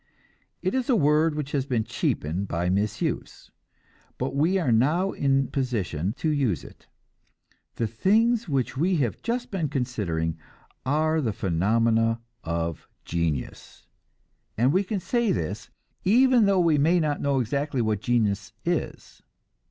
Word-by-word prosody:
It 185 - 0
is 260 -1 -1
a 255 - +5
word 150 -2 +3
which 150 -2 -4
has 140 -2 -1
been 120 -5 0
cheapened 90 0 -2
by 90 +1 -1
misuse, 100 +2 -2 0.7
but - - -3
we 165 +7 +2
are 165 -10 +1
now 155 +12 +2
in 135 -1 +1
position 105 - -2
to 155 - -2
use 135 - 0
it. - - -15 0.9
The 115 - -1
things 215 - +2
which 135 -4 -1
we 175 +7 +1
have 130 -9 -1
just 240 +1 -3
been 170 -7 -1
considering 90 - -2 0.5
are 155 +3 +2
the 115 -6 0
phenomena 115 +4 +1 0.2
of 85 -1 -3 0.2
genius 80 -5 -3 0.7
and 125 +6 +3
we 190 +2 +3
can 200 +1 -2
say 235 +3 0
this, 100 - -3 0.3
even 240 +2 +5
though 195 -2 +3
we 165 -4 +3
may 165 +5 +4
not 150 -3 -1
know 140 -1 +1
exactly 140 +3 -1
what 110 -3 0
genius 110 -2 0
is. 175 -1 -3
135 Hz, 145 wpm, -25 LUFS, 110-170 Hz, 0.9 s, a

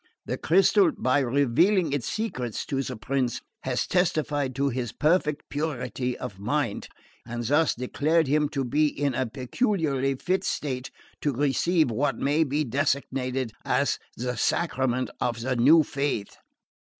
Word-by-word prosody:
The - - -2
crystal, 190 +1 +4
by 130 +4 +2
revealing 145 - +2
its 145 -5 -2
secrets 125 - -3
to 135 -1 -1
the 130 -1 -4
prince, 125 +1 -1 0.2
has - - -1
testified 150 -7 0
to 140 +1 +1
his 120 -2 -3
perfect 150 -2 +1
purity 125 -4 -3
of 105 -7 -7
mind, 125 +1 -1 0.4
and 120 +1 -5
thus 145 +7 +2
declared 155 +6 +1
him 150 +1 +2
to 135 -3 -2
be 150 +5 +2
in 145 -2 -1
a 130 0 -1
peculiarly 135 - 0
fit 185 +7 -1
state 130 -7 -3 0.3
to 145 - 0
receive 145 +3 +2
what 135 +2 0
may 145 +3 +2
be 150 +1 0
designated 130 -2 -1
as - - +1 0.2
the 125 0 -3
Sacrament 130 -6 0
of 120 -1 -1
the 130 +2 -1
new 150 +7 +6
faith." 140 -7 -2
140 Hz, 145 wpm, -26 LUFS, 125-155 Hz, 0.4 s, new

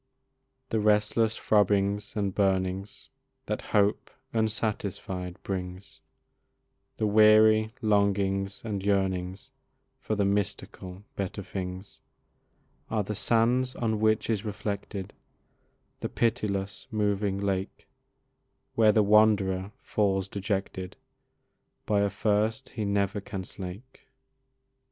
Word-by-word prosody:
The 110 - +1
restless 105 +1 +2
throbbings 105 0 +2
and 100 -3 -1
burnings 95 0 -1 0.4
That - - -2
hope 105 0 +1 0.2
unsatisfied 105 -4 -2
brings, 95 0 -5 1.0
The 110 - 0
weary 110 +1 +5
longings 100 -2 +1
and 100 -3 -2
yearnings 95 +2 -1 0.5
For 110 - -2
the 100 -1 +1
mystical 95 -1 -3
better 100 +1 -4
things, 95 +1 -6 0.9
Are 110 -2 0
the 105 - -4
sands 120 +4 +2
on 110 -3 -1
which 110 0 +2
is 110 -3 0
reflected 100 -2 -4 0.9
The - - -3
pitiless 105 -4 -1
moving 105 -2 0
lake, 100 -1 -3 0.9
Where 110 -2 +5
the 105 0 +4
wanderer 100 -2 +3
falls 95 -2 +1
dejected, 95 -2 -3 0.9
By 105 -1 +2
a 100 0 +2
thirst 105 +5 0
he 110 - -4
never 100 0 0
can 95 -1 -5
slake. 95 +8 -9
100 Hz, 100 wpm, -28 LUFS, 95-110 Hz, 1.0 s, weary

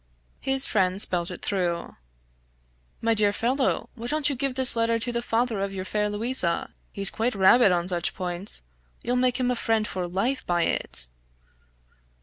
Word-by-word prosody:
His 270 0 0
friend 190 -2 +1
spelt 175 -4 +1
it - - -8
through. 175 -4 -2 1.1
"My 230 0 +2
dear 210 -2 +3
fellow, 255 +6 -1
why 235 0 -7
don't 295 +1 +1
you - - -2
give 265 0 -2
this 260 -2 +4
letter 230 0 +1
to 235 +2 -3
the 235 0 -2
father 230 -2 0
of 195 0 -3
your 185 0 -4
fair 210 +1 -1
Louisa; 205 -4 0 0.2
he's 195 -1 -1
quite 230 +1 -1
rabid 195 +3 +5
on 175 0 0
such 175 -2 -1
points; 180 - -2 0.4
you'll 245 - 0
make 250 0 +1
him 250 -1 +1
a - - 0
friend 225 -2 0
for 180 -2 -4
life 235 +9 -1
by 175 -1 +1
it!" - - +2
220 Hz, 175 wpm, -25 LUFS, 185-245 Hz, 1.1 s, rabid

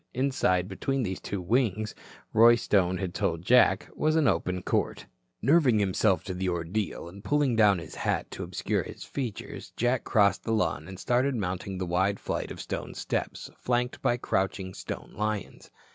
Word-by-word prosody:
Inside, 120 -9 +1
between 130 +7 -1
these 95 -3 -3
two 100 - -4
wings, 110 +1 0 0.4
Roy 115 +2 +7
Stone 95 -5 +2
had 95 -2 -3
told 90 -5 -1
Jack, 125 +4 +5
was 155 0 +1
an 160 -3 +4
open 90 -2 0
court. - - -1 0.4
Nerving 135 -3 +5
himself 95 -2 +2
to 95 - -4
the 90 +1 -1
ordeal, 85 +2 -2
and 100 +4 -11
pulling 145 -3 +2
down 105 -3 +5
his 85 -2 -8
hat - - -2
to - - -6
obscure - - -1
his - - -9
features, 125 -7 -6
Jack 120 +1 +1
crossed 100 -2 +3
the 115 - -1
lawn 80 -7 0
and 95 0 -8
started 125 +5 +1
mounting 95 -2 -3
the 90 - -2
wide 95 +3 +1
flight - - -3
of - - -8
stone - - -5
steps - - -3
flanked 125 0 -1
by 120 - +2
crouching 95 -4 -1
stone 95 - -7
lions. 105 -1 -3
100 Hz, 175 wpm, -28 LUFS, 95-120 Hz, 0.4 s, Roy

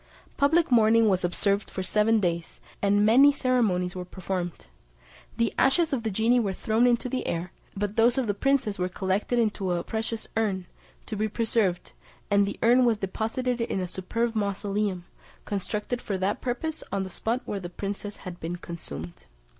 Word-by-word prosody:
Public 315 +2 +3
mourning 225 -1 +5
was 185 -2 +1
observed 200 +3 0
for 190 - -4
seven 215 +3 +3
days, 170 -3 -2 0.2
and 205 +1 +3
many 265 +6 +7
ceremonies 220 -10 +1
were 180 - -4
performed. 180 -1 -4 0.7
The 230 -1 +1
ashes 310 +4 +3
of 255 - 0
the 220 - -2
genie 225 +5 +3
were 200 -5 0
thrown 225 +5 +2
into 240 0 +2
the 255 +1 -3
air, 170 +2 -2 0.3
but 205 +1 -2
those 235 +2 +4
of 265 - +1
the 205 - 0
princess 235 -2 +1
were 180 0 0
collected 190 +5 -1
into 210 -5 +1
a 175 - -1
precious 225 0 -4
urn, 200 -5 0 0.4
to 220 - -5
be 215 +1 0
preserved, 215 -4 0 0.4
and 200 0 +4
the - - -4
urn 245 +2 +6
was 235 -3 +3
deposited 225 +5 -2
in 230 -4 -1
a 185 - -2
superb 225 +6 -2
mausoleum, 200 -3 -1 0.4
constructed 210 +4 -3
for 195 - -2
that 190 +2 -1
purpose 300 +6 -3
on 195 0 0
the 190 - -6
spot 230 +7 -1
where 200 - -3
the 175 -2 -6
princess 200 +2 -5
had 180 -1 -7
been 170 +2 -4
consumed. 155 - -8
210 Hz, 180 wpm, -27 LUFS, 190-235 Hz, 0.7 s, many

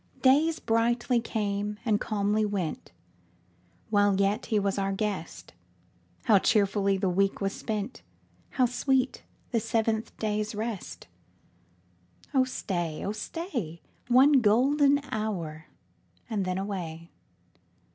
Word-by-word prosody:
Days 300 +5 +4
brightly 235 +2 +1
came 210 -2 -2
and 215 -2 +2
calmly 210 0 0
went, 195 -6 -3 1.0
While 205 -2 +3
yet 200 +2 +1
he 220 - +1
was 200 -1 0
our 195 0 0
guest; 195 - -4 0.7
How 210 -3 +5
cheerfully 200 -1 +2
the 190 0 0
week 195 +2 +1
was 195 0 -1
spent! 210 - -4 0.5
How 255 - +2
sweet 255 +1 0 0.3
the 235 - +2
seventh 225 -1 -1
day's 215 0 -2
rest! 215 -2 -5 1.3
Oh 260 -2 +4
stay, 175 -10 -3
oh 200 - -1
stay. 215 - -5 0.2
One 260 +4 +6
golden 280 +6 +4
hour, 180 -8 -3 0.6
and 210 -5 -1
then 185 0 -1
away. 175 -4 -5
210 Hz, 115 wpm, -28 LUFS, 195-235 Hz, 1.3 s, One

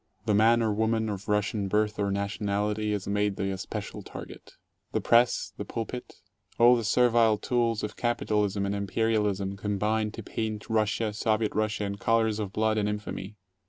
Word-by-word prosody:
The 110 - +2
man 115 +3 +5
or 110 -2 +1
woman 110 +1 +1
of 100 -1 -5
Russian 105 -1 0
birth 105 +1 0
or 100 -1 +1
nationality 105 +1 -1
is 105 -2 -2
made 105 0 0
the 95 0 -2
especial 95 - -5
target. - - -10 0.4
The - - +2
press, 120 +1 +3
the - - -5
pulpit, 120 +2 -6 0.4
all 120 +1 +7
the 115 - -1
servile 115 0 +4
tools 115 -1 0
of 105 - -5
capitalism 105 -4 0
and 100 - -1
imperialism 100 -1 0
combine 105 +2 0
to 115 - -7
paint 110 +1 -4
Russia, 110 0 +1
Soviet 110 0 0
Russia, 105 0 0
in 100 0 -3
colors 110 0 +1
of 100 -3 -3
blood 110 +1 +1
and 105 0 0
infamy. 105 -1 -5
105 Hz, 165 wpm, -28 LUFS, 100-110 Hz, 0.4 s, all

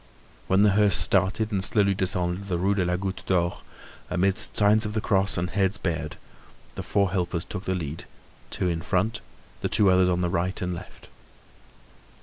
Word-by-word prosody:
When 95 +2 +4
the 105 - +5
hearse 100 -1 +3
started 95 +6 +1
and 95 -2 0
slowly 100 0 +3
descended 90 0 -1
the 90 -3 -2
Rue 95 +3 +1
de 100 -2 0
la 90 0 0
Goutte 95 +1 -4
d'Or, 85 -2 0 0.5
amidst 95 +4 0
signs 105 +1 +5
of 105 -1 -4
the 110 - 0
cross 95 -1 +1
and 90 +1 -2
heads 100 0 +1
bared, 85 -5 -3 0.6
the - - -5
four 100 -3 0
helpers 90 -2 -2
took 100 -1 -7
the 95 - -1
lead, 80 -3 -5 0.4
two 90 - -2
in 85 -2 -1
front, 105 +6 -1 0.4
the - - -1
two 100 -3 +3
others 90 0 +4
on 90 0 0
the 90 - 0
right 90 +2 -1
and 90 -1 -2
left. 85 - -10
95 Hz, 185 wpm, -25 LUFS, 90-100 Hz, 0.6 s, the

